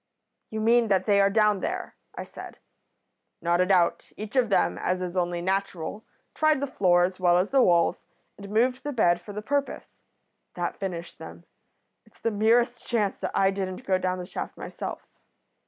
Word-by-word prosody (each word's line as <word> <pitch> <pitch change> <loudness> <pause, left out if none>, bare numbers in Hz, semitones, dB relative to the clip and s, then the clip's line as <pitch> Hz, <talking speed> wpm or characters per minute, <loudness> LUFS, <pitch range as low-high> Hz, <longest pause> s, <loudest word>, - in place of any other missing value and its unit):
"'You 220 0 -4
mean 230 +1 +4
that 195 -3 +2
they 200 -2 +4
are 195 - +4
down 210 -1 +3
there?' 365 - -4 0.2
I - - -5
said. - - -11 0.8
"'Not 170 +1 +1
a 180 - +2
doubt. 180 -3 +2
Each 215 +4 -7
of 250 -4 +3
them, 200 - +1
as 185 0 -1
is 180 0 -5
only 175 -1 -1
natural, 195 +1 -3 0.3
tried 310 -2 +2
the 280 - -1
floor 180 -9 +3
as 185 +1 -2
well 175 -1 +4
as 185 +3 0
the 275 -1 +5
walls, 170 -6 +2 0.3
and 200 0 -10
moved 245 +5 +1
the 290 - -3
bed 175 -7 +2
for 205 - -10
the 210 +1 -6
purpose. 280 +4 -3 0.5
That 175 -1 -3
finished 175 -3 -5
them. - - -10 0.6
It's - - -26
the 230 - -1
merest 235 +3 +2
chance 215 -5 -1
that - - -5
I 195 0 +4
didn't 190 -1 -5
go 185 -1 +2
down 185 0 -1
the 180 - -6
shaft - - -6
myself.' - - -6
200 Hz, 190 wpm, -26 LUFS, 180-230 Hz, 0.8 s, the